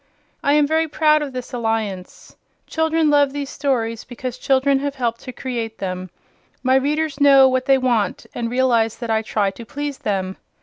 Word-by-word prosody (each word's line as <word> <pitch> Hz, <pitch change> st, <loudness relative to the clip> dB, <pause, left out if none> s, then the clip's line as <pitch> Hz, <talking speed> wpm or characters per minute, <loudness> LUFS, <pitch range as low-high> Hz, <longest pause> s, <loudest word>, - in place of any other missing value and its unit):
I 285 Hz, -, +3 dB
am 300 Hz, -1 st, +4 dB
very 320 Hz, +2 st, +1 dB
proud 305 Hz, 0 st, +3 dB
of 290 Hz, -2 st, -4 dB
this 255 Hz, -1 st, -7 dB
alliance. 225 Hz, -6 st, -3 dB, 0.3 s
Children 320 Hz, -1 st, +1 dB
love 285 Hz, -2 st, +3 dB
these 285 Hz, -1 st, -4 dB
stories 230 Hz, -5 st, -1 dB
because 250 Hz, 0 st, -7 dB
children 270 Hz, +1 st, +2 dB
have 285 Hz, 0 st, -3 dB
helped 235 Hz, -3 st, -2 dB
to 255 Hz, -, -7 dB
create 235 Hz, -3 st, -5 dB
them. 185 Hz, -1 st, -4 dB, 0.5 s
My 260 Hz, 0 st, +3 dB
readers 290 Hz, +2 st, 0 dB
know 275 Hz, -2 st, +7 dB
what 260 Hz, 0 st, 0 dB
they 270 Hz, -1 st, +5 dB
want 240 Hz, -7 st, 0 dB
and 235 Hz, -1 st, -3 dB
realize 235 Hz, -3 st, +2 dB
that 235 Hz, -2 st, -5 dB
I 220 Hz, 0 st, +2 dB
try 210 Hz, -2 st, 0 dB
to 235 Hz, -, -10 dB
please 285 Hz, +4 st, -5 dB
them. 190 Hz, -2 st, -2 dB
260 Hz, 180 wpm, -21 LUFS, 225-285 Hz, 0.5 s, know